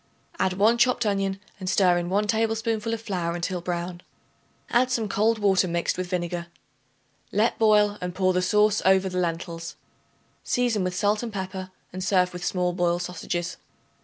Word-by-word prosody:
Add 185 - +2
1 215 +5 +3
chopped 245 -1 +3
onion 195 -1 0 0.2
and 185 -1 -3
stir 180 -3 +4
in 175 0 -4
1 205 +3 +1
tablespoonful 225 0 0
of 230 - -2
flour 175 -5 -2
until 175 +1 -3
brown; 175 0 -4 0.7
add 250 +2 +3
some 230 -4 0
cold 220 +3 +2
water 195 -3 +3
mixed 170 0 -1
with 185 0 -3
vinegar. 175 -1 -2 0.8
Let 215 +3 +1
boil 210 -2 +4
and 180 0 -4
pour 185 -1 +2
the 180 - +1
sauce 210 +3 +3
over 190 0 +4
the 180 0 -2
lentils. 165 -1 -3 0.7
Season 240 -5 +1
with 185 0 -2
salt 205 +3 +1
and 235 -2 -5
pepper, 190 -1 -5 0.2
and 185 0 -4
serve 180 -1 +2
with 180 0 -6
small 180 -1 0
boiled 175 0 0
sausages. 175 0 -4
190 Hz, 170 wpm, -25 LUFS, 180-210 Hz, 0.8 s, stir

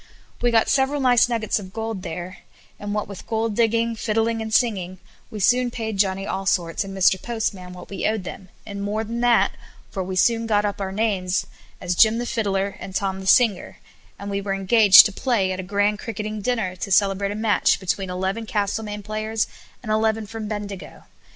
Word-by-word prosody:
We 240 - +3
got 225 -1 +3
several 275 +1 +1
nice 245 -3 +4
nuggets 220 -3 0
of 190 -2 -10
gold 225 -3 -4
there; 180 +2 -7 0.4
and 205 0 -5
what 210 - -2
with 200 -2 -10
gold 225 -1 -1
digging, 230 0 +1
fiddling, 225 +1 -1
and 220 0 -5
singing, 195 -6 0 0.3
we 215 - -7
soon 245 +5 +3
paid 220 -4 -5
Johnny 195 -1 +1
Allsorts 190 -3 -1
and 195 0 -8
Mr. 190 0 +3
Postman 210 -6 -3
what 180 0 -11
we 200 - -2
owed 215 -2 -1
them; 185 +1 -9 0.2
and 200 -2 -6
more 210 +2 -2
than 230 +2 -4
that, 240 -1 +4 0.4
for 190 - -3
we 185 +1 -5
soon 230 +4 +2
got 210 -1 +2
our 200 -2 -3
names 195 -3 0
up - - -22 0.3
as 180 - -1
Jim 220 +5 +5
the 240 - -2
Fiddler 200 -4 -1
and 190 - -8
Tom 190 -1 -1
the 190 - -7
Singer; 210 -3 +3 0.4
and 200 0 -6
were 200 0 -2
engaged 195 +1 +7
to 210 - 0
play 205 -3 0
at 185 - -4
a - - -1
grand 205 +2 0
cricketing 215 -1 -5
dinner, 210 -5 -1
to 195 - -5
celebrate 195 +1 +2
a - - -4
match 215 -1 +2
between 190 0 -2
eleven 190 +5 -3
Castlemaine 210 0 -2
players 215 +1 -2 0.4
and 215 - -4
eleven 220 0 +1
from 220 0 -6
Bendigo. 205 -2 -7
210 Hz, 195 wpm, -22 LUFS, 195-225 Hz, 0.4 s, engaged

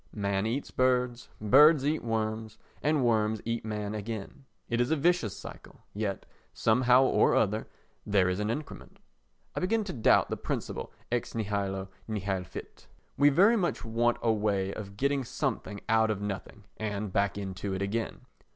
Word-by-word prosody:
Man 100 0 0
eats 130 +5 -3
birds, 125 -1 +1
birds 140 +6 +6
eat 155 +2 0
worms 110 -1 -2 0.2
and 150 -4 +2
worms 110 -2 +2
eat 115 0 -2
man 105 -1 -3
again. 110 +5 -6 0.2
It 120 +1 0
is 120 - +1
a 160 - +3
vicious 155 - +1
circle, - - -11
yet, 100 -2 -3 0.3
somehow 125 +3 +4
or - - +3
other, 110 +1 +1 0.4
there 100 -3 +2
is 90 +1 -1
an 105 +1 -1
increment. 145 +6 -6 0.6
I - - -2
begin 220 +4 +1
to 200 - -5
doubt 115 - +3
the - - -1
principle - - -4 0.2
ex 120 -1 -2
nihilo 100 -3 -2 0.2
nihil 100 -4 -2
fit. - - -10 0.3
We 145 +1 +5
very 200 +11 +5
much 175 - -1
want 115 +1 +1
a 115 - +4
way 100 -2 0
of 100 -2 -8
getting 140 +2 +1
something 105 -3 -3
out 110 0 +3
of 105 -2 -1
nothing 100 +1 -5
and 105 -2 -3
back 100 0 +1
into 95 0 -4
it 95 - -2
again. 110 +5 -3
110 Hz, 165 wpm, -29 LUFS, 100-125 Hz, 0.6 s, birds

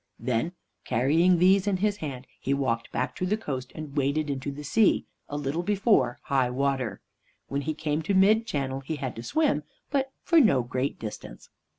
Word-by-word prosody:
Then, 125 +8 -1 0.3
carrying 160 +10 +3
these 190 +3 +4
in 195 -2 +2
his 205 +2 0
hand, 135 -7 -6
he 140 - 0
walked 115 -4 -1
back - - -2
to 185 - -1
the 210 +3 +1
coast 130 - -5
and 155 -3 -7
waded 145 +1 +1
into 140 +1 -3
the 145 +2 -8
sea, 205 +8 +3 0.2
a 145 - -3
little 145 +3 -1
before 195 - +2
high 130 -3 +1
water. 130 -5 -1 0.5
When 140 +1 -1
he 155 +2 -3
came 155 0 -1
to 190 +5 0
mid 215 +4 +5
channel, 135 -5 -2
he 140 +4 -4
had 130 -4 -4
to - - -4
swim, 295 - +1 0.3
but 270 -2 0
for 335 -2 +5
no 175 - +4
great 130 +3 -2
distance. 110 -2 -8
145 Hz, 190 wpm, -27 LUFS, 130-190 Hz, 0.5 s, mid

